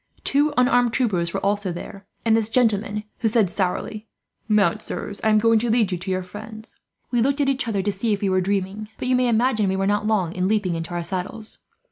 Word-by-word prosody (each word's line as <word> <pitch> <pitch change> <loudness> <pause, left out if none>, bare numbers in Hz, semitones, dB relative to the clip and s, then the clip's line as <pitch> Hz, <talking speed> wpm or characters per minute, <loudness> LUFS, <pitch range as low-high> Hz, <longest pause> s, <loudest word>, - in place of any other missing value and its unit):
Two 290 +2 +3
unarmed 245 -2 +3
troopers 185 -10 0
were - - -3
also 205 -2 0
there, 195 +3 -8 0.2
and 225 -1 +4
this 225 -1 0
gentleman, 210 -3 +1 0.2
who 230 - +1
said 215 -5 +3
sourly: 210 +3 -2 0.4
"'Mount, 215 0 +2
sirs, 205 -1 -5
I 220 - +3
am 215 - +5
going 225 +1 +4
to 235 +2 -1
lead 220 -4 +2
you 180 - -1
to 185 +2 -6
your 185 0 -1
friends.' 215 +4 -10 0.4
"We 240 -2 +2
looked 275 +4 +1
at 285 - +2
each 265 -2 0
other, 200 -4 -1
to 205 - 0
see 200 +4 -1
if 205 - 0
we 200 - +1
were 185 0 +2
dreaming, 200 +2 -2
but - - -4
you 255 - +3
may 250 0 +2
imagine 225 -3 +2
we 190 - 0
were 195 0 0
not 205 +1 +1
long 190 -6 +1
in 185 -2 0
leaping 205 -4 +1
into 165 +1 -4
our 175 - -2
saddles. 190 +5 -3
210 Hz, 235 wpm, -23 LUFS, 190-230 Hz, 0.4 s, am